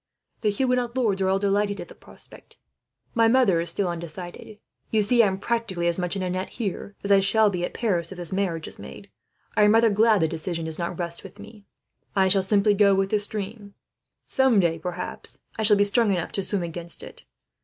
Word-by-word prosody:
"The 215 - +2
Huguenot 250 +2 0
lords 210 -6 +1
are 190 - +2
all 190 - +3
delighted 200 +1 0
at - - -7
the - - -13
prospect. - - -13 0.6
My 230 -2 +4
mother 225 -8 +4
is 170 - -3
still 190 +3 -1
undecided. 175 +4 -7 0.3
You 215 -1 +2
see, 235 +3 +4
I 220 - +4
am 190 -1 -2
practically 210 -5 -2
as 170 +1 +1
much 180 +1 -2
in 195 - -2
a 180 - -2
net, 185 +1 -3
here, 205 -2 -5
as 200 - -1
I 200 - +7
shall 210 +2 +3
be 180 -2 -3
at - - -4
Paris, 180 -7 0
if 190 - -8
this 175 0 -7
marriage 180 -5 -1
is - - -10
made. - - -11 0.4
I - - +3
am 210 +1 +6
rather 225 -1 +5
glad 215 -1 +4
the 160 - +3
decision 165 +1 -4
does 160 +1 -5
not 170 0 -3
rest 170 -1 -5
with - - -12
me. 210 0 -13 0.5
I 190 -1 +4
shall 195 0 +4
simply 205 +2 +3
go 200 -1 +4
with 195 0 0
the 210 - +3
stream; 205 0 -5 0.5
some 265 -5 +3
day, 165 -3 +1
perhaps, 180 +2 -6 0.2
I - - -4
shall 210 -1 +4
be 200 - +4
strong 210 +2 +2
enough 180 -4 -1
to 195 - -1
swim 190 -1 -2
against 170 0 -6
it. - - -12
200 Hz, 225 wpm, -25 LUFS, 180-215 Hz, 0.6 s, I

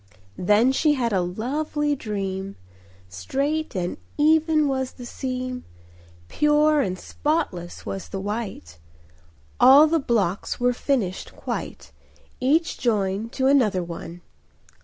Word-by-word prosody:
Then 210 +7 +4
she 295 +3 +3
had 235 -5 -1
a 190 - +2
lovely 290 - -1
dream; 195 -4 -4 0.5
Straight 275 - -2
and 180 -1 -2 0.2
even 310 0 +3
was 265 -2 -2
the 245 - -10
seam, 255 0 -4 0.6
Pure 300 - +3
and 185 -6 -2
spotless 185 - -3
was 195 - -5
the 195 - -4
white; 195 - -5 0.8
All 280 +4 +8
the 325 +1 +2
blocks 205 - -1
were 245 0 +2
finished 235 -8 -2
quite— - - -6 0.5
Each 305 +6 +1
joined 210 -2 0
to 260 - -1
another 230 -10 +3
one. 170 0 -8
245 Hz, 115 wpm, -24 LUFS, 195-290 Hz, 0.8 s, All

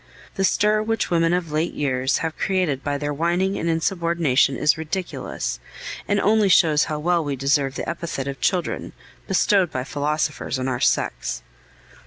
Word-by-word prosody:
The 195 - -1
stir 210 +2 +3
which 225 -2 -1
women 165 -1 +3
of 175 -3 -1
late 155 +3 -1
years 130 -2 0
have 160 - -3
created 180 -8 0
by 145 -1 -1
their 145 0 -2
whining 175 +6 0
and 170 - -1
insubordination 165 -6 +1
is 150 - +3
ridiculous, 160 +4 -4 0.5
and 205 0 +2
only 210 0 +3
shows 155 -4 +5
how 155 - -3
well 170 +2 +1
we 145 -2 -2
deserve 135 0 +1
the - - -4
epithet 170 -5 -4
of 140 -1 -5
children, 180 -2 -1 0.3
bestowed 190 -1 +3
by 130 - -2
philosophers 145 0 -2
on 130 0 -2
our 125 -2 -1
sex." - - 0
160 Hz, 165 wpm, -23 LUFS, 145-180 Hz, 0.5 s, shows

